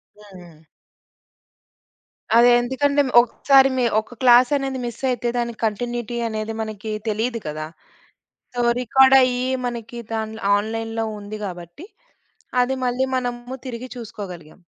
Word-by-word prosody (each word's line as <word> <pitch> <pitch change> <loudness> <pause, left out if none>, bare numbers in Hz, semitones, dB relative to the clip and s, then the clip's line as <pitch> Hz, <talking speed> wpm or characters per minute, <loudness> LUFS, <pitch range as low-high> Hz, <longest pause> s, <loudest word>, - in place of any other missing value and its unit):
హ్మ్. 210 -2 -17
హ్మ్. 170 -3 -16 1.7
అదే 240 +1 +7
ఎందుకంటే, 280 +3 +1 0.2
ఒకసారి 270 +3 +4
మి 250 - +2 0.2
ఒక 220 +3 -9
క్లాసనేది 260 +2 +4
మిస్సైతే 245 0 -2
దానికి 235 -2 -3
కంటిన్యూటి 240 +2 -3
అనేది 220 0 -4
మనకి 215 0 -5 0.2
తెలీదు 225 +3 -1
కదా! 155 +1 -5 0.9
సో, 245 - 0 0.2
రికార్డయ్యి 255 0 +4 0.2
మనకి 235 0 -6
దాంట్ల 220 0 -4 0.2
ఆన్‌లైన్‌లో 225 +1 -3
ఉంది 205 +1 -8
గాబట్టి, 175 - -9 0.8
అది 265 +1 -2
మళ్ళీ 250 +2 0
మనము 245 0 -3
తిరిగి 250 +1 -6
చూసుకోగలిగాం. 185 -7 -9
235 Hz, 110 wpm, -22 LUFS, 215-250 Hz, 1.7 s, అదే